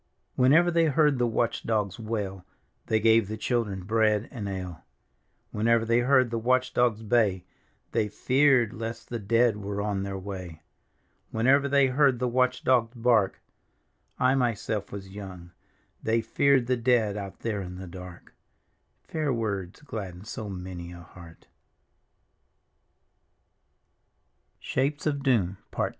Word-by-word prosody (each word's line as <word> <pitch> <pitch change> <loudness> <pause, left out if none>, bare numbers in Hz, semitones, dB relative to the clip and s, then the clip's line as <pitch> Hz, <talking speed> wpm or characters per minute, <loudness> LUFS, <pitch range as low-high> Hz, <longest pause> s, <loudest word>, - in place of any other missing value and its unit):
Whenever 155 +8 +5
they 165 -1 +3
heard 150 -3 +3
the 120 - +2
watch 115 0 0
dogs 105 -4 -1
wail, 105 -4 -4 0.4
They 110 - +2
gave 110 -1 +4
the 110 +1 -5
children 105 -7 -1
bread 110 +1 +1
and 105 -7 -5
ale. 90 -4 -6 0.7
Whenever 115 +1 +2
they 115 +1 +3
heard 130 -1 +3
the 115 - -1
watch 130 +2 +1
dogs 115 -3 +1
bay, 105 -5 +1 0.5
Thy 105 - +1
feared 130 +1 +2
lest 115 0 -6
the 120 - -3
dead 115 +1 +2
were 100 0 -4
on 100 -1 -1
their 100 0 -4
way. 90 -5 -8 0.7
Whenever 135 +5 +3
they 140 -1 +4
heard 135 0 +3
the 125 +1 -1
watch 125 +1 +1
d(^ 125 -3 +3
bark, 115 -4 +2 0.4
/ - - -45
myself 120 -5 0
vas 100 -1 -8
young. 95 -3 -10 0.5
They 115 +1 +1
feared 130 +3 +2
the 125 +1 +1
dead 115 -4 +2
out 100 -2 -7
there 105 -3 -2
in 90 -1 -7
tfic 95 -2 -9
dark. 90 -1 -11 0.7
Fair 155 -3 -2
words 105 -2 -3
gladden 95 -9 -7
so 110 -1 -6
many 90 -2 -7
a 85 0 -10
heart. 85 -1 -15
110 Hz, 130 wpm, -27 LUFS, 100-125 Hz, 0.7 s, Whenever